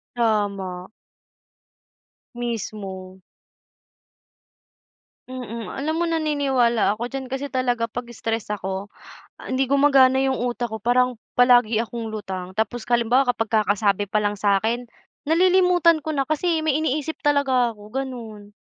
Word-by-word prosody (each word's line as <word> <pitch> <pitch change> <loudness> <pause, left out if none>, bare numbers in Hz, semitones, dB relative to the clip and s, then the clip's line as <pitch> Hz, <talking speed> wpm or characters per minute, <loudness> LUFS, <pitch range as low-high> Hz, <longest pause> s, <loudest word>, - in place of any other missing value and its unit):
Tama. 200 -5 -1 1.4
Mismo. 195 -5 -6 2.1
Mm, 235 -3 -6
alam 305 +3 -2
mo - - +2
naniniwala 270 -9 +1
ako 240 - -2
diyan 265 +1 -5
kasi 270 +2 -3
talaga 250 -4 0
'pag 240 +1 -7
stress 225 -2 -4
ako, 195 0 -4 0.5
hindi 260 +1 -1
gumagana 270 -1 +4
yung 265 -1 0
utak 240 -1 -2
ko 220 - -4
parang 245 +2 +1 0.2
palagi 245 -3 +4
akong 230 0 -6
lutang. 190 -4 -6
Tapos 220 +2 -2
halimbawa 240 +2 +2
kapag 225 -1 -3
kakasabi 205 -2 +1
palang 205 0 -1
sakin, 220 +5 +1 0.4
nalilimutan 355 0 +4
ko 315 - -1
na 275 - +1
kasi 315 +3 0
may 305 -2 +1
iniisip 310 0 -2
talaga 265 -5 +2
ako, 210 - -16
ganu'n. 225 -6 -6
240 Hz, 120 wpm, -23 LUFS, 215-270 Hz, 2.1 s, gumagana